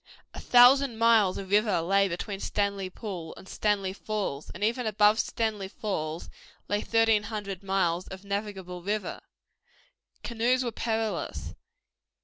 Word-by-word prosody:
A - - -7
thousand 245 0 +6
miles 225 -5 +4
of 195 -1 -7
river 210 -3 +3
lay 195 +4 +3
between 195 +3 -4
Stanley 200 -2 -1
Pool 185 -5 -7
and - - -13
Stanley 200 -3 0
Falls, 200 -9 -4
and 185 - -7
even 235 +2 0
above 210 +1 +4
Stanley 215 -4 -1
Falls 170 -6 -4 0.4
lay 205 0 0
thirteen 225 -2 +3
hundred 205 -3 -5
miles 185 -3 0
of 190 +1 -10
navigable 200 -3 -4
river. 210 +3 -3 1.0
Canoes 240 +2 +1
were 240 - -2
perilous. 225 -1 -3
205 Hz, 130 wpm, -28 LUFS, 190-220 Hz, 1.0 s, thousand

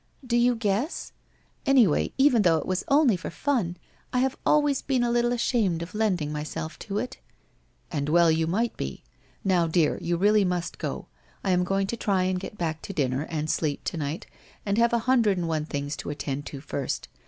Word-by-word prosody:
Do 240 -1 0
you 240 +1 +4
guess? 225 - -1 0.5
Anyway, 245 - +4
even 265 -4 +5
though 170 -5 +4
it - - -3
was 185 0 -1
only 280 -6 +4
for 180 - -5
fun, 225 -12 -1 0.3
I - - -1
have 265 +2 +1
always 290 -2 +3
been 260 -3 +1
a 240 - +1
little 240 0 +2
ashamed 220 -8 +1
of 170 - -10
lending 190 -9 0
myself 155 +2 -5
to 200 -1 -4
it.' 250 - -4 0.4
' - - -39
And 145 -2 -2
well 170 +1 +5
you 160 0 +1
might 225 +7 0
be. 70 0 -5 0.4
Now, 180 -3 +3
dear, 160 -1 +2
you 170 0 0
really 205 +3 +4
must 180 -2 -2
go. - - -4 0.4
I - - +1
am 180 0 +3
going 195 +2 0
to 230 +4 -3
try 195 -4 +1
and 185 0 0
get 195 +2 -8
back 160 -3 -2
to 195 - -7
dinner 140 -2 -1
and 155 -2 -2
sleep 155 -2 -1
to 170 - -3
night, 150 +2 -3 0.4
and 200 +2 +1
I - - +5
have 235 0 +3
a - - +4
hundred 235 -6 +3
and 175 -1 -1
one 155 -2 -1
things 145 0 -3
to - - -6
attend 145 -1 -4
to 140 - -7
first. 140 -2 -3
185 Hz, 210 wpm, -26 LUFS, 160-235 Hz, 0.5 s, even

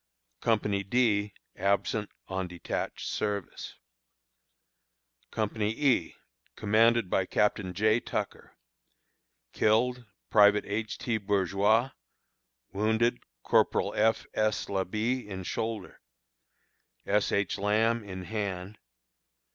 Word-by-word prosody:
Company 105 -3 +1
D, 105 -1 +1 0.2
absent 100 +2 0 0.2
on 95 -1 -3
detached 90 -1 -4
service. 100 -3 -3 1.5
Company 105 -1 -1
E, 130 - +1 0.4
commanded 115 +1 +3
by 95 +1 0
Captain 105 -2 +1
J. 110 +3 +3
Tucker. - - -5 1.0
Killed: 120 +3 +2 0.3
Private 105 -1 +6
H. 105 +1 -3
T. 120 -3 -1
Bourgois. 100 +4 +2 0.8
Wounded: 110 +4 +1 0.2
Corporal - - +2
F. 110 +1 +2
S. 110 0 0
Labit, 105 +6 -1
in 95 -2 -6
shoulder; 110 +1 -4 1.0
S. 105 +1 +1
H. 100 -2 0
Lamb, 110 +3 +2
in 95 -2 -7
hand. 100 -1 -4
105 Hz, 90 wpm, -29 LUFS, 100-115 Hz, 1.5 s, Private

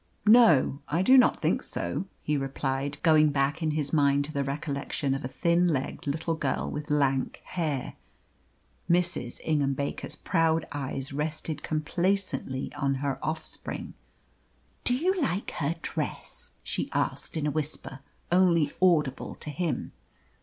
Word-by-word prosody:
"No; 210 - +6
I 170 +5 +1
do 260 +7 +6
not 255 -2 +5
think - - +2
so," - - -3 0.2
he 150 - 0
replied, 135 0 -2
going 155 -2 +6
back 145 +3 0
in 160 - +1
his 150 -1 -2
mind 140 -2 +3
to 155 - -8
the 140 - 0
recollection 140 0 -2
of 135 - -3
a - - -2
thin 170 +5 +2
legged 145 -3 -2
little 160 +3 -1
girl 145 -4 -1
with 150 +2 -5
lank 140 -3 +1
hair. 155 -7 -3 0.9
Mrs. 170 -8 +2
Ingham 145 -3 +1
Baker's 140 +1 -4
proud 165 -2 +1
eyes 135 -1 -4
rested 150 +1 -3
complacently 155 -3 -1
on 140 -2 0
her 140 0 -3
offspring. 155 0 -4 0.9
"Do 245 - +3
you 365 +7 +1
like 205 -7 -1
her 155 +2 -1
dress?" - - -5
she - - -3
asked - - 0
in 150 - -1
a 150 - +1
whisper 145 -3 -4 0.3
only 170 -5 +4
audible 155 -8 +2
to 150 - -7
him. 170 +1 -2
150 Hz, 145 wpm, -28 LUFS, 140-170 Hz, 0.9 s, No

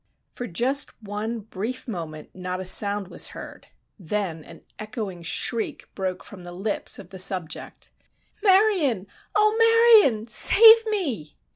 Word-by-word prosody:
For 245 - -6
just 255 +10 -2
one 215 +3 -4
brief 220 +6 -6
moment 165 -8 -7
not 180 0 -5
a 185 - -6
sound 200 +1 0
was - - -1
heard; - - -11 0.3
then 180 -3 -3
an - - -15 0.2
echoing 215 -4 -6
shriek 220 +7 -3
broke 185 -2 -4
from 190 -3 -13
the 175 - -9
lips 195 +4 -3
of 180 - -12
the 190 - -9
"subject." 185 -3 -3 0.5
"Marion! 375 - +3 0.3
Oh, 425 +1 +3 0.5
Marion! 220 - 0
Save 445 - +6
me!" 270 - -3
210 Hz, 135 wpm, -24 LUFS, 185-255 Hz, 0.5 s, Save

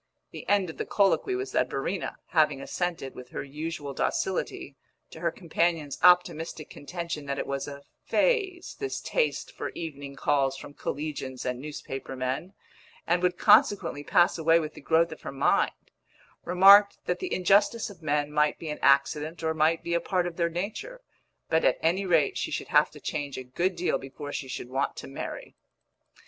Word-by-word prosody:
The - - -9
end 195 -4 +2
of - - -17
the - - -3
colloquy 205 - +2
was 395 +1 -4
that - - +1
Verena, - - -3
having 155 -4 +3
assented, 165 -1 -3
with 125 0 -11
her - - -5
usual 145 0 -5
docility, 145 -2 -2 0.4
to - - -10
her 170 0 +1
companion's 165 -3 -1
optimistic 170 -3 +3
contention 170 -1 -6
that 140 0 -2
it - - -2
was 140 +1 -3
a 140 -1 -8 0.2
"phase," 390 -8 0
this 410 - -3
taste - - -1
for - - -5
evening 140 -4 -6
calls 135 -1 +1
from 140 - -10
collegians 140 -4 -5
and 125 -1 -2
newspaper 135 -2 -6
men, 130 +9 -3 0.5
and 175 +1 +1
would 180 -1 +1
consequently 205 -8 +4
pass 175 +2 +3
away 165 +1 +4
with 155 -2 -4
the - - -12
growth 165 +1 +2
of 155 - -9
her - - -6
mind, 135 0 0 0.5
remarked 200 +3 +7
that 180 - -1
the - - -4
injustice 205 +4 +3
of 180 -4 -15
men 150 -1 0
might 150 0 +2
be 160 -2 -5
an 150 - -6
accident 150 +4 +2
or 160 0 +1
might 160 +1 +2
be 170 - -2
a 170 - +2
part 180 0 0
of 175 -1 -4
their 170 -1 +1
nature, 210 - -5 0.5
but 160 - +2
at - - +3
any 185 +4 +1
rate 160 -5 +2
she - - -2
should - - -4
have - - +4
to - - -13
change 145 -3 -4
a 130 - -5
good 175 +9 -1
deal 170 -6 0
before 145 +2 -8
she 135 - -4
should 125 -1 -6
want 135 +1 -1
to - - -8
marry. 135 - -7
160 Hz, 185 wpm, -27 LUFS, 140-180 Hz, 0.5 s, remarked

